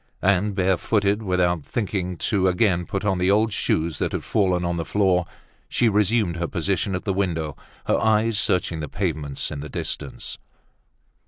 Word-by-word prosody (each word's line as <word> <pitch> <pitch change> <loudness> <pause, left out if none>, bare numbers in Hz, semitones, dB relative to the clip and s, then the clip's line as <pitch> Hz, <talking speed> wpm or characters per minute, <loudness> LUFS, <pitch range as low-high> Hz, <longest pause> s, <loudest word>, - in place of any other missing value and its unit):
And 100 +1 +2
bare 95 -1 +2
footed, 105 +1 +1
without 90 -5 +1
thinking 95 -4 -2
to 95 0 +1
again 90 -2 +2
put 100 +1 -3
on 95 -3 +1
the 90 +1 +2
old 105 +2 +3
shoes 80 -2 0
that - - -1
had - - -2
fallen 90 -4 +1
on 85 0 -1
the 85 - -1
floor, 95 -2 +2 0.4
she 120 - +3
resumed 105 -3 +2
her 85 0 -1
position 95 +2 -1
at 90 - -4
the 100 - 0
window, 80 -6 -1 0.3
her - - +2
eyes 110 0 +3
searching 85 -2 +1
the 75 - -4
pavements 80 -8 -2
in 75 - -5
the 75 +1 -7
distance. - - -5
95 Hz, 175 wpm, -23 LUFS, 85-105 Hz, 0.4 s, old